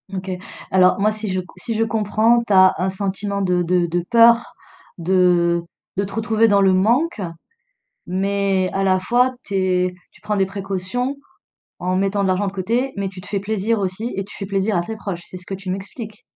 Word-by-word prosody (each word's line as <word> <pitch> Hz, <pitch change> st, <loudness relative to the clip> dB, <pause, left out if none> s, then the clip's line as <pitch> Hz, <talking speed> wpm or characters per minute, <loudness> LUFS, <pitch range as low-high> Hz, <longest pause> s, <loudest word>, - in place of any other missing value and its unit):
OK. 185 Hz, 0 st, -4 dB, 0.4 s
Alors 185 Hz, 0 st, +4 dB
moi, 215 Hz, +2 st, +3 dB
si 215 Hz, -1 st, -5 dB
je 185 Hz, -, 0 dB
c 180 Hz, -, -6 dB
si 230 Hz, -, -4 dB
je 225 Hz, -, +2 dB
comprends, 220 Hz, +2 st, +2 dB
tu 205 Hz, -, 0 dB
as 185 Hz, 0 st, +7 dB
un 185 Hz, +2 st, 0 dB
sentiment 200 Hz, +1 st, -3 dB
de 180 Hz, -2 st, +1 dB
de 175 Hz, 0 st, +2 dB
de 170 Hz, +1 st, -1 dB
peur 235 Hz, 0 st, +5 dB, 0.4 s
de 175 Hz, -1 st, +2 dB, 0.3 s
de 200 Hz, -, +1 dB
te 195 Hz, -, -6 dB
retrouver 225 Hz, +1 st, +2 dB
dans 200 Hz, -2 st, +4 dB
le 190 Hz, -1 st, +4 dB
manque, 235 Hz, -, +2 dB, 0.8 s
mais 195 Hz, 0 st, 0 dB
à 195 Hz, 0 st, 0 dB
la 185 Hz, -1 st, +3 dB
fois, 245 Hz, +6 st, +2 dB
tu 200 Hz, -, -5 dB
es 185 Hz, -1 st, +1 dB, 0.2 s
tu -, -, -22 dB
prends 210 Hz, -1 st, -2 dB
des 190 Hz, -, +3 dB
précautions 200 Hz, +7 st, -3 dB, 0.6 s
en 185 Hz, +1 st, -1 dB
mettant 195 Hz, +1 st, +1 dB
de -, -, +1 dB
l'argent 185 Hz, +2 st, +1 dB
de 190 Hz, -, -2 dB
côté, 230 Hz, +8 st, -1 dB
mais 200 Hz, -1 st, -1 dB
tu 185 Hz, -1 st, -9 dB
te -, -, -13 dB
fais 200 Hz, -, -1 dB
plaisir 215 Hz, +2 st, -1 dB
aussi 195 Hz, +5 st, -3 dB
et 195 Hz, -, -2 dB
tu 200 Hz, -, -13 dB
fais 195 Hz, -, -5 dB
plaisir 195 Hz, +2 st, 0 dB
à 175 Hz, -, +2 dB
tes 220 Hz, +5 st, -5 dB
proches, 190 Hz, -5 st, -5 dB
c'est 185 Hz, -, -8 dB
ce 180 Hz, -, -14 dB
que -, -, -6 dB
tu 190 Hz, 0 st, -6 dB
m'expliques? 210 Hz, +3 st, -7 dB
195 Hz, 215 wpm, -21 LUFS, 185-215 Hz, 0.8 s, as